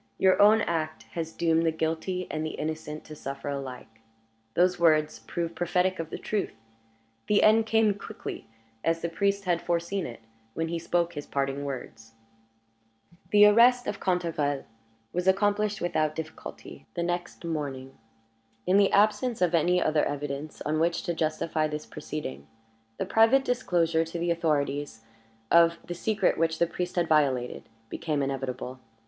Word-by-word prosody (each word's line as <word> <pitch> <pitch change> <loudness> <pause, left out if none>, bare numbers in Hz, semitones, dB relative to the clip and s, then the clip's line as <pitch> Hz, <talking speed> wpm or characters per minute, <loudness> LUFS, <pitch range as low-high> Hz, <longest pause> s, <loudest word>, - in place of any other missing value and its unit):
Your 190 0 +4
own 215 +2 +7
act 155 -3 -2
has 165 -1 -3
doomed 165 -1 +2
the 165 - +2
guilty 160 +3 -2
and 155 - -2
the 155 - -4
innocent 155 0 -5
to 155 - -10
suffer 140 0 -6
alike." 130 -5 -7 0.5
Those 180 0 +3
words 155 -2 +3
proved 170 -1 -3
prophetic 180 +2 +1
of 165 -1 -4
the - - -5
truth. 210 -2 -2 0.7
The 210 - +4
end 220 +1 +5
came 220 -1 +3
quickly, 200 - -8 0.4
as 165 0 +1
the 170 - 0
priest 200 +3 0
had 175 -2 +1
foreseen 170 +2 -1
it, 115 -1 -10 0.3
when 165 0 -2
he 170 0 -2
spoke 170 +1 0
his 145 -2 -6
parting 140 0 -2
words. 115 -4 -7 1.2
The 210 0 +7
arrest 240 +4 +6
of 205 - -3
Cantegrel 165 -6 0 0.5
was 180 +1 -1
accomplished 205 +2 +2
without 155 -3 0
difficulty 160 - -8
the 170 - -1
next 175 0 -3
morning. 140 -5 -4 0.7
In 190 - +4
the 200 -1 +4
absence 215 +4 +2
of 180 -1 +2
any 175 +2 +3
other 155 -3 +2
evidence 145 +1 -4
on 155 +1 -1
which 170 +1 +1
to 170 - -1
justify 155 -1 0
this 150 0 -5
proceeding, 70 - -6 0.5
the - - -2
private 235 +5 +4
disclosure 170 -9 +1
to 165 +1 -6
the 170 +1 0
authorities 145 -6 -1 0.5
of 170 0 +6
the 175 - -4
secret 210 +2 0
which 165 -1 +1
the 170 - +3
priest 175 +1 -4
had 175 -2 +1
violated 135 -6 +1 0.2
became 150 +3 -2
inevitable. 130 -1 -4
165 Hz, 155 wpm, -27 LUFS, 150-180 Hz, 1.2 s, own